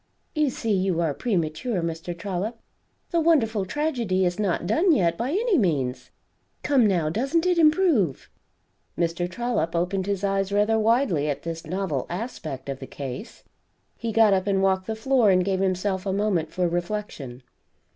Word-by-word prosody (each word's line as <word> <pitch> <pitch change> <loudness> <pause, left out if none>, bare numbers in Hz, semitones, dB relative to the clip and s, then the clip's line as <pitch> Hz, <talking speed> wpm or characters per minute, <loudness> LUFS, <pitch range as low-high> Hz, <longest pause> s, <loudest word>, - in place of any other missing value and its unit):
You 305 -3 +2
see 225 -3 -2
you 185 -3 +1
are 165 -4 +1
premature, 185 - -1
Mr. 165 +1 -4
Trollop, 200 +5 -3 0.5
the 340 - +2
wonderful 230 - +2
tragedy 235 -7 0
is 175 +2 -1
not 190 -4 0
done 325 - +3
yet, 170 -4 +2
by 235 +8 -2
any 400 - +2
means. 130 - -1 0.5
Come, 270 -6 +4
now, 175 -6 +1
doesn't 275 - 0
it 360 -1 +2
improve?" 305 - +3 0.7
Mr 170 +1 -1
Trollop 185 -5 -2
opened 185 +3 -1
his 200 -1 -2
eyes 195 0 0
rather 210 +2 +2
widely 220 - +2
at 140 - -3
this 165 -1 -6
novel 175 -6 -2
aspect 170 - -5
of 135 -1 -4
the 135 - -8
case. 140 - -7 0.5
He 230 -1 -4
got 220 -2 +5
up 190 +1 0
and 195 -1 +2
walked 190 -1 +1
the 220 - -2
floor 240 -1 +3
and 185 -1 +3
gave 190 -1 0
himself 190 +1 -1
a 190 - 0
moment 195 -6 0
for 180 -1 0
reflection. 170 - -4
195 Hz, 165 wpm, -25 LUFS, 170-230 Hz, 0.7 s, got